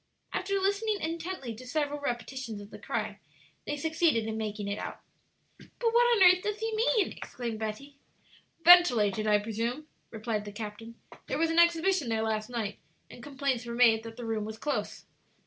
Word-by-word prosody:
After 395 +2 -1
listening 405 +2 0
intently 330 -6 -4
to 250 +3 -11
several 290 +1 -1
repetitions 245 -3 -4
of 205 0 -11
the - - -10
cry, - - -3 0.5
they 295 - -2
succeeded 320 -6 +1
in 220 0 -3
making 210 -2 -4
it 200 +1 -3
out. - - -6 0.6
"But 460 -2 -3
what 480 0 +5
on 385 - +6
earth 365 0 +7
does 420 +1 -2
he 445 0 -2
mean?" 440 -1 +2
exclaimed 235 -3 -6
Betty. 225 +6 -6 0.7
"Ventilated, 225 - +6
I 210 -1 +5
presume," 230 +7 -3 0.2
replied 220 -1 -3
the 205 - -7
captain. 220 +2 -8 0.3
"There - - -2
was 330 +1 +1
an 330 - +3
exhibition 340 -3 +3
there 220 -1 0
last 220 0 -2
night, 225 -4 -4 0.3
and - - -11
complaints 275 -2 -2
were 235 - -4
made 230 -2 +5
that 225 0 -10
the 240 - -6
room 220 -2 -1
was 220 +1 -6
close." 295 +5 -3
245 Hz, 180 wpm, -29 LUFS, 220-340 Hz, 0.7 s, earth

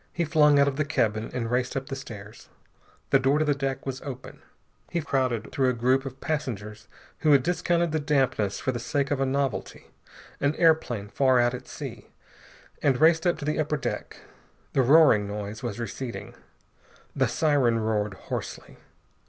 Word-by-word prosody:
He 170 - -1
flung 150 -2 +4
out 140 0 +5
of 135 -1 -1
the 150 - +2
cabin 110 -7 0
and 120 -2 -3
raced 125 +1 0
up 135 - -3
the 135 - -5
stairs. 110 -6 -10 0.6
The 135 - +6
door 135 +2 +2
to 155 - +1
the 145 - +3
deck 135 -1 -3
was 135 -1 -4
open. 130 -3 -8 0.5
He 170 - -1
crowded 130 -7 -1
through 130 -2 +2
a - - +1
group 130 +3 +1
of 135 0 -9
passengers 110 -9 -4 0.3
who 155 -2 +4
had 135 -2 +5
discounted 170 0 +1
the 155 - 0
dampness 135 -9 0
for 130 - -1
the 120 - -4
sake 140 +3 -1
of 145 - 0
a 135 - +2
novelty 135 -3 -3 0.5
an 140 +2 +1
airplane 155 - +2
far 130 +3 +2
out 120 0 +3
at 125 +1 -7
sea 120 -7 -8 0.7
and 135 -3 +2
raced 160 +2 +4
up 175 - +2
to 145 - -6
the 150 +1 -1
upper 150 0 0
deck. - - -5 0.6
The 135 - +3
roaring 130 -6 +5
noise 105 +1 -6
was 120 -3 -4
receding. 120 +2 -6 0.8
The - - +2
siren 140 -7 +2
roared 105 -2 -1
hoarsely. - - -7
135 Hz, 180 wpm, -26 LUFS, 115-150 Hz, 0.8 s, The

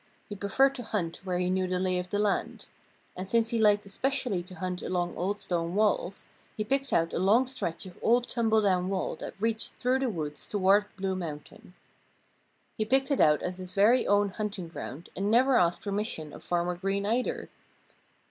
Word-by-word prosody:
He 205 - -5
preferred 235 +8 +2
to 265 - -6
hunt 180 -7 -2
where 180 -1 -1
he 180 0 0
knew 185 0 +1
the 180 0 -1
lay 185 -1 0
of 180 0 -5
the 205 - -1
land. 205 -1 -1 0.5
And 185 +1 -5
since 230 0 +2
he 230 - 0
liked 205 -1 +4
especially 250 -1 -1
to 180 +1 -9
hunt 180 +1 -3
along 175 -1 -2
old 200 +4 -2
stone 170 -2 -2
walls, 205 -2 0 0.3
he 215 - 0
picked 275 +4 -1
out 165 0 +1
a - - 0
long 210 +8 +4
stretch 250 -10 -4
of 180 -2 -12
old 240 +2 +3
tumble 225 -2 +2
down 185 -2 +2
wall 195 -1 -2
that - - -7
reached 225 +1 -1
through 255 +1 0
the 265 -2 0
woods 150 -7 -5
towards 205 +1 +3
Blue 190 -1 -1
Mountain. 165 +1 -8 1.0
He 215 - 0
picked 265 +6 +1
it 280 - +2
out 150 -1 +4
as 180 0 -3
his 185 0 -7
very 220 +6 +4
own 205 0 +3
hunting 200 -4 -4
ground 165 -1 -8
and 195 +3 -1
never 255 +4 +4
asked 175 -5 +2
permission 200 -7 -3
of - - -11
Farmer 175 0 0
Green, 195 +2 -1
either. 235 +4 -1
195 Hz, 195 wpm, -29 LUFS, 180-220 Hz, 1.0 s, liked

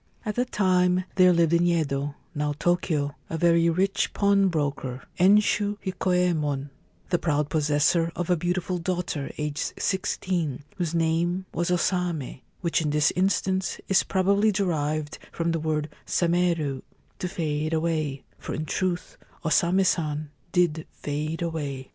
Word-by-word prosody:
At 210 - -1
that 245 +3 -1
time 180 -2 +3
there 185 -1 +6
lived 170 -1 +3
in 170 +1 +4
Yedo, 145 -4 0 0.2
now 150 -1 -1
Tokio, 160 -5 0
a 165 - -2
very 170 0 +4
rich 190 +4 +1
pawnbroker, 155 -10 +1 0.2
Enshu 205 +2 +4
Hikoyemon, 175 -7 0 0.4
the 175 - +3
proud 150 -2 0
possessor 155 +2 +2
of 175 - -2
a 180 - +3
beautiful 175 +2 -1
daughter 170 -5 -2
aged 150 0 -2
sixteen, 175 -7 -1
whose 170 -2 -2
name 170 +3 +1
was 170 +2 -1
O 180 - +3
Same, 175 -7 -1 0.2
which 170 -2 +1
in 155 - 0
this 150 0 +2
instance 190 +1 0
is 195 - +4
probably 200 +3 +2
derived 155 -6 -1
from 170 0 -1
the 165 - 0
word 155 -1 -1
' - - -31
sameru 170 -6 +1 0.2
' - - -37
(to 180 - -2
fade 155 -3 -2
away), 155 -4 -1 0.2
for - - -5
in 155 - -3
truth 180 +3 -2 0.3
O - - +2
Same 175 +4 +3
San 150 -4 0 0.2
did 165 -3 +1
fade 155 +3 -4
away. 145 -6 -4
170 Hz, 150 wpm, -26 LUFS, 150-180 Hz, 0.4 s, there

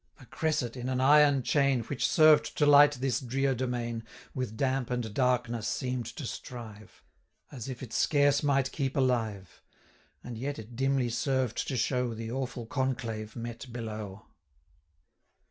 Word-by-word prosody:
A 135 - -14
cresset, 130 -5 -2
in 125 0 -4
an 130 -1 -1
iron 145 0 +5
chain, 140 -3 +2
350 - - -18
Which 135 - +1
served 155 -2 +5
to 150 - +3
light 145 0 +7
this 130 -2 -1
drear 135 +1 0
domain, 120 -2 -3 0.3
With 125 -4 -4
damp 130 -1 0
and 120 -4 -3
darkness 120 -2 0
seem'd 125 -3 -2
to 120 +4 -7
strive, 110 -4 -9 0.5
As 130 -3 -7
if 130 0 -6
it 120 - -9
scarce 145 -1 +3
might 135 -3 +1
keep 135 -2 -2
alive; 115 - -1 0.6
And 120 -2 -7
yet 140 +3 -3
it 110 +2 -10
dimly 135 -1 +1
served 125 0 -1
to 130 - -2
show 125 -1 0
The 115 0 -6
awful 130 -2 -4
conclave 115 -4 -3
met 120 +1 -7
below. 110 -3 -6
125 Hz, 155 wpm, -29 LUFS, 115-135 Hz, 0.6 s, light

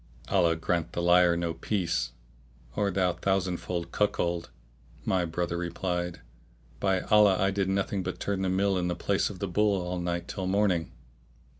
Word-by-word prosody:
"Allah 85 -1 +3
grant 85 0 -1
the 85 - -1
liar 85 0 +5
no 85 -1 -1
peace, 85 - -1 0.6
O 100 -1 +1
thou 90 -2 +1
thousandfold 90 -3 -1
cuckold!", 85 -6 0 0.6
my 90 -2 +1
brother 85 +1 -2
replied, 90 0 -3 0.6
"by 95 -2 +1
Allah, 105 -3 +5
I 95 -1 +2
did 100 -1 0
nothing 95 0 0
but 90 0 -4
turn 100 -1 -2
the 95 - 0
mill 95 0 +2
in 90 - -1
the 90 - -1
place 100 -1 0
of 100 - -8
the 100 - -3
bull 100 +2 +2
all 90 0 -3
night 85 0 -2
till 95 -2 -4
morning!" 95 -4 +1
90 Hz, 165 wpm, -28 LUFS, 85-95 Hz, 0.6 s, liar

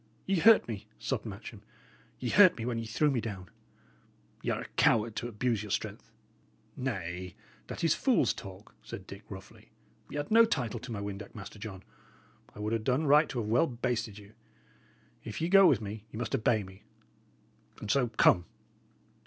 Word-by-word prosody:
"Ye 195 -1 +1
hurt 225 +5 +6
me," 105 -2 -6
sobbed - - -3
Matcham. - - -8 0.6
"Ye 125 - -2
hurt 185 -3 +7
me 115 - -4
when 120 -2 -1
ye 115 - -5
threw 145 +7 +2
me 125 -4 0
down. 100 -6 -7 0.9
Y' - - -2
are - - -1
a - - -7
coward 110 0 +2
to 120 - -2
abuse 115 -1 -1
your 105 - -7
strength." - - -3 0.7
"Nay, 90 -8 -4 0.3
that - - -6
is - - +4
fool's - - +2
talk," - - -11
said 95 - -8
Dick, 100 +1 -10
roughly. 95 -1 -11 0.4
"Y' - - -5
had 145 +5 -4
no 230 +1 +8
title 130 - -1
to 125 - -8
my 110 - -3
windac, 100 0 -6
Master 105 0 -9
John. 95 -3 -8 0.7
I - - -10
would 105 +2 -2
'a' 115 - +1
done 130 +7 0
right 150 +2 +5
to 130 - -5
have 105 - -4
well 120 +9 +3
basted 120 -4 -2
you. 105 0 -14 0.9
If - - -6
ye 165 +1 -1
go 195 0 +8
with - - +3
me, 105 0 -6
ye - - -9
must 120 +2 -4
obey 110 -4 +2
me; 95 +1 -13 1.0
and 105 - -2
so, 130 -1 +3
come." 100 -5 +4
115 Hz, 185 wpm, -30 LUFS, 100-130 Hz, 1.0 s, no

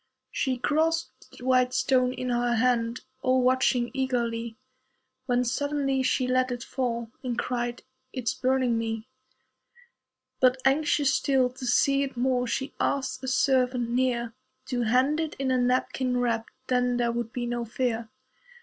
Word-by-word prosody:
She 260 -2 -1
grasped 320 +5 -1
the 250 - -10
"white 255 -1 +3
stone" 255 -1 +2
in 255 0 -4
her 240 0 +1
hand, 235 0 +1 0.2
All 255 -1 +2
watching 250 -1 +2
eagerly, 235 -4 -2 0.7
When 245 -1 +2
suddenly 275 +1 0
she 260 0 +1
let 255 0 +1
it 245 -1 -4
fall, 235 -3 -3
And 250 -2 -3
cried, 240 -1 -2 0.3
"It's 250 -5 -2
burning 255 -3 +1
me." 225 -1 -3 1.3
But, 255 0 +4
anxious 290 0 +3
still 260 -3 +2
to 255 0 -7
see 275 +3 +3
it 275 -3 -3
more, 250 0 +1
She 265 +4 -3
asked 270 -1 -1
a - - -4
servant 255 -2 +2
near 240 -2 0 0.4
To 245 -2 -1
hand 255 +7 +2
it 320 -2 -2
in 265 -1 -1
a 255 - +3
napkin 250 0 0
wrapped 230 -2 0 0.2
Then 250 -1 +1
there 240 -1 +1
would 235 -1 -3
be 245 -1 -3
no 240 0 -2
fear. 235 -1 -2
250 Hz, 150 wpm, -27 LUFS, 240-260 Hz, 1.3 s, But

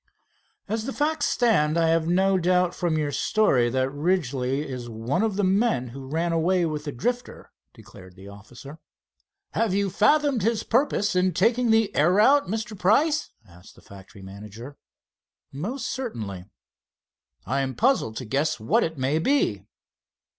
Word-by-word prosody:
"As 220 +2 -3
the 270 - -4
facts 300 0 0
stand, 170 -11 +2
I 165 -1 +2
have 165 0 +1
no 190 +3 +2
doubt 180 0 +2
from 170 -3 -1
your 150 -2 -1
story 135 - +2
that 130 +2 -1
Ridgely 145 -4 -1
is 125 -3 -7
one 115 - -2
of 220 -3 0
the 205 - 0
men 190 - +1
who 135 +2 -9
ran 165 +4 -1
away 175 +2 +1
with 150 -1 -4
the 145 - -3
Drifter," 245 - -4 0.2
declared 95 -1 -15
the 95 +1 -13
officer. 120 +9 -12 0.7
"Have 220 -4 0
you 200 -1 0
fathomed 280 - +2
his 225 +1 0
purpose 225 -5 0
in 180 -2 +1
taking 230 +5 +2
the 225 -1 +2
air 155 +5 +3
route, 270 +8 +4
Mr. 220 +2 -4
Price?" 290 - +2 0.2
asked 90 0 -17
the - - -18
factory 95 0 -14
manager. 105 +7 -10 0.8
"Most 225 - -5
certainly." 110 - -5 1.0
"I 135 +7 -1
am 130 -1 -3
puzzled 225 - +1
to 130 - -5
guess 135 +4 -1
what 110 - +1
it 160 -1 -4
may 135 +4 0
be." 160 - 0
165 Hz, 160 wpm, -24 LUFS, 130-220 Hz, 1.0 s, route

